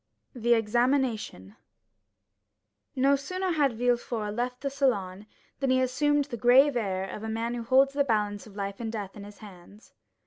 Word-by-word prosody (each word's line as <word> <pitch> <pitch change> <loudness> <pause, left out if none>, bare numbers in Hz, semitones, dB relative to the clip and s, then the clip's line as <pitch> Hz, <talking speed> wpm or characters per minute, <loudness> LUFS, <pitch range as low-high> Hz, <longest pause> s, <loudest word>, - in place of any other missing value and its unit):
The 240 -2 +2
Examination 225 - -1 1.4
No 275 +1 +3
sooner 370 +7 -3
had 290 -6 +2
Villefort 235 -2 -1
left 250 +2 -3
the 275 0 -3
salon, 210 -8 -1 0.3
than 270 - 0
he 260 0 +3
assumed 285 +3 +1
the 245 -4 -6
grave 255 +4 +5
air 195 -4 -2
of 205 - -7
a 220 - -5
man 230 +2 -2
who 240 - -4
holds 265 +4 +3
the 280 0 +2
balance 210 -4 -1
of 200 - -15
life 200 -1 -5
and 225 -2 -4
death 205 -4 -6
in 205 - -9
his 205 0 -13
hands. 200 +2 -16
240 Hz, 170 wpm, -27 LUFS, 210-270 Hz, 1.4 s, grave